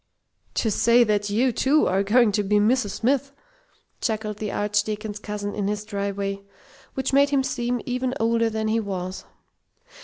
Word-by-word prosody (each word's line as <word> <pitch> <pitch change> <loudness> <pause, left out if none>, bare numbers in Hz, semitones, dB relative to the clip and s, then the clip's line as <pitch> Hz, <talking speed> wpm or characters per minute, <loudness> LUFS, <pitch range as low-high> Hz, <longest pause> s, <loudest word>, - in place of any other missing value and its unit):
"To 220 - +1
say 235 +4 +5
that 205 -2 0
you, 240 +5 +2
too, 275 +6 +3
are 190 +1 +2
going 220 +3 +4
to 210 - +1
be 205 +1 0
Mrs. 215 +2 +3
Smith!" 275 +6 0 0.7
chuckled 215 -2 -2
the 210 -1 -4
Archdeacon's 210 0 -1
cousin 205 -1 -5
in 205 -2 -2
his 210 0 -2
dry 200 -1 -2
way, 200 0 -3 0.5
which 265 0 -2
made 280 +1 +5
him 280 -2 +2
seem 245 -2 -2
even 250 +1 -2
older 230 0 +2
than 220 0 -2
he 220 +1 +1
was. 190 -3 -5
215 Hz, 165 wpm, -24 LUFS, 205-245 Hz, 0.7 s, say